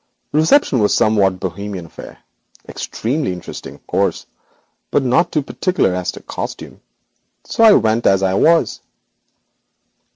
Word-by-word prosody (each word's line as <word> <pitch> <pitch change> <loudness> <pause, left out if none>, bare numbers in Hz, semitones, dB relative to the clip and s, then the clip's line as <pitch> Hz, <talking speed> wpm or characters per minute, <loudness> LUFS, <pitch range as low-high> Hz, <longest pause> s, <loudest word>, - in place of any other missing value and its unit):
The 150 - +1
reception 160 - +3
was 105 -1 +2
a - - +2
somewhat 100 -4 +2
bohemian 95 0 -5
affair, 80 - -12 0.5
extremely 130 0 -3
interesting, 90 - -9
of - - -23
course, - - -1 0.6
but 140 - +1
not 165 +8 +2
too 150 - 0
particular 180 - 0
as 90 -1 -2
to - - -11
costume, - - -7 0.6
so 230 - 0
I 220 -2 +8
went 110 - +2
as 95 0 +3
I 95 -1 +1
was. 165 - +2
110 Hz, 140 wpm, -18 LUFS, 95-155 Hz, 0.6 s, I